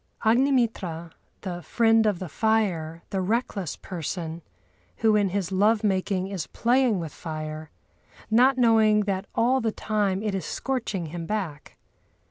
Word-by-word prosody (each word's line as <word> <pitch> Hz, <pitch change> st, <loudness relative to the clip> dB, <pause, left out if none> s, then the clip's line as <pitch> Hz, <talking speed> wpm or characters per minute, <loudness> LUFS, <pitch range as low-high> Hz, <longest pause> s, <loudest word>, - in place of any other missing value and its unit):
Agnimitra, 225 Hz, -, +1 dB, 0.3 s
"the 175 Hz, -3 st, -5 dB
friend 225 Hz, +3 st, +3 dB
of 205 Hz, -4 st, +1 dB
the 185 Hz, -, -6 dB
fire," 170 Hz, -5 st, 0 dB
the 195 Hz, -, -1 dB
reckless 200 Hz, -, -1 dB
person, 170 Hz, -1 st, -5 dB, 0.6 s
who 220 Hz, -1 st, +3 dB
in 205 Hz, -2 st, +2 dB
his 190 Hz, -1 st, -2 dB
love 210 Hz, +3 st, +3 dB
making 190 Hz, -2 st, 0 dB
is 190 Hz, -5 st, -4 dB
playing 240 Hz, -3 st, +2 dB
with 160 Hz, -4 st, -6 dB
fire, 155 Hz, -1 st, -6 dB, 0.6 s
not 255 Hz, +4 st, +5 dB
knowing 220 Hz, -3 st, +4 dB
that 195 Hz, -1 st, -2 dB
all 255 Hz, +3 st, +3 dB
the 225 Hz, -1 st, 0 dB
time 205 Hz, -3 st, -1 dB
it 210 Hz, -2 st, -1 dB
is 195 Hz, -, -2 dB
scorching 230 Hz, -9 st, -3 dB
him 170 Hz, -1 st, -5 dB
black. 185 Hz, -9 st, -4 dB
200 Hz, 140 wpm, -25 LUFS, 175-225 Hz, 0.6 s, not